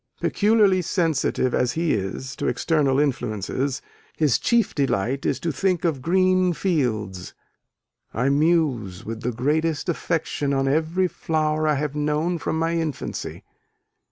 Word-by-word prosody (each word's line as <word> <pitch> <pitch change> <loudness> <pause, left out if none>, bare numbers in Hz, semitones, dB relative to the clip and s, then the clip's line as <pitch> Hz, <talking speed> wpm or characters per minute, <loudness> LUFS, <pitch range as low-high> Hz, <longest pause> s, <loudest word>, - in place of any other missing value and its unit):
Peculiarly 205 -3 +3
sensitive, 160 -7 0
as 125 -1 +1
he 165 0 0
is, 105 +7 -4
to - - -2
external 145 -5 +1
influences, 130 -1 -1 0.3
his 145 -8 +2
chief 235 -3 +2
delight 135 -1 0
is - - 0
to 170 - -2
"think 180 +5 0
of 150 -6 0
green 185 +2 +3
fields... 110 - -2 0.8
I 125 +4 0
muse 140 - +1
with 115 0 -5
the 125 - -1
greatest 150 +6 0
affection 155 -4 -1
on 135 0 +1
every 160 +6 +1
flower 155 -2 -1
I 150 - +3
have 145 0 -2
known 150 +4 0
from 160 - -2
my 165 +1 0
infancy." 160 -4 -4
150 Hz, 135 wpm, -23 LUFS, 130-165 Hz, 0.8 s, Peculiarly